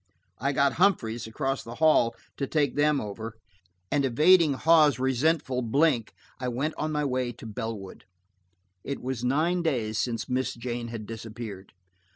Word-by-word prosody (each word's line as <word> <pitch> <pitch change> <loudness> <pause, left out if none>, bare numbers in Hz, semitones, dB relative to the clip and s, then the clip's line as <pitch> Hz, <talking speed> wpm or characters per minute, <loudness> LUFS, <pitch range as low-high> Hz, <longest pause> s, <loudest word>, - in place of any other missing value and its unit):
I 135 +4 0
got 140 -1 +2
Humphreys, 120 - +2
across 135 +4 -2
the 115 +1 -8
hall, 155 -7 +4 0.2
to 140 - -2
take 145 -1 +1
them 145 0 +2
over, 110 +1 -6 0.5
and 145 -1 +2
evading 155 +5 +5
Hawes' 150 -2 +4
resentful 130 +1 +1
blink, 125 0 +1 0.2
I 125 - -3
went 135 +6 -1
on 155 0 -2
my 150 -1 0
way 130 -2 -1
to 115 - -12
Bellwood. 110 -2 -6 0.8
It 140 - -4
was 125 -2 -4
nine 160 +8 +1
days 115 -10 -1
since 115 -1 -2
Miss 130 0 -1
Jane 120 0 -4
had 115 -2 -6
disappeared. 110 -3 -8
130 Hz, 155 wpm, -27 LUFS, 115-150 Hz, 0.8 s, evading